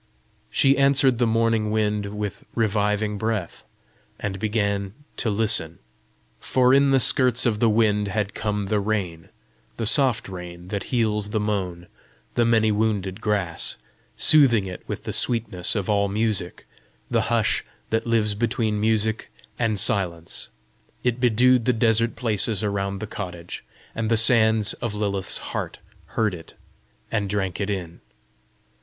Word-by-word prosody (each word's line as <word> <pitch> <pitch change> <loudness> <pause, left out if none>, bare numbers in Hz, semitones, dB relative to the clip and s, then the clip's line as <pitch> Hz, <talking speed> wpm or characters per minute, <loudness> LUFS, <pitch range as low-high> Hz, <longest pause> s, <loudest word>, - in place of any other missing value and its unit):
She 135 0 +3
answered 135 -3 +3
the 120 - +3
morning 115 -1 +1
wind 105 -1 0
with 105 -1 -5
reviving 105 -1 0
breath, 110 -5 -3 0.6
and 100 -1 -4
began 100 -1 -1 0.2
to 115 - -1
listen. 100 -6 +1 0.6
For 130 0 +2
in 140 0 +5
the 135 -1 +4
skirts 125 -1 +3
of 110 -3 +1
the 115 - +3
wind 105 -2 +2
had 105 0 -2
come 105 -1 -2
the 105 +1 0
rain 100 -6 -3 0.5
the 115 - -2
soft 125 0 +3
rain 90 -1 -9
that 100 -1 -3
heals 105 -4 0
the 110 - -1
mown, 95 -5 -3 0.5
the 120 - +2
many 110 -2 +3
wounded 105 -2 -1
grass 100 -6 -1 0.4
soothing 125 -10 +4
it 90 -1 -7
with - - -5
the - - -4
sweetness 115 -7 0
of 100 -4 -2
all 100 -1 +2
music, 105 -3 -2 0.5
the - - +2
hush - - +1 0.3
that 110 +1 0
lives 110 -3 +2
between 110 -1 -1
music 110 0 0 0.3
and 110 -4 +1
silence. 85 -5 +1 0.5
It 125 0 0
bedewed 125 0 +3
the 125 - +3
desert 115 0 +2
places 110 -3 +1
around 100 -1 -2
the - - -3
cottage, 90 -5 -7 0.3
and 110 0 -2
the 115 - +3
sands 110 -2 +4
of 110 -3 -3
Lilith's 100 -2 -1
heart - - -4 0.4
heard 110 -3 +2
it, 80 -2 -11 0.6
and 105 -3 -1
drank 95 -1 -2
it 100 - -2
in. 90 -4 -5
105 Hz, 145 wpm, -23 LUFS, 100-115 Hz, 0.6 s, in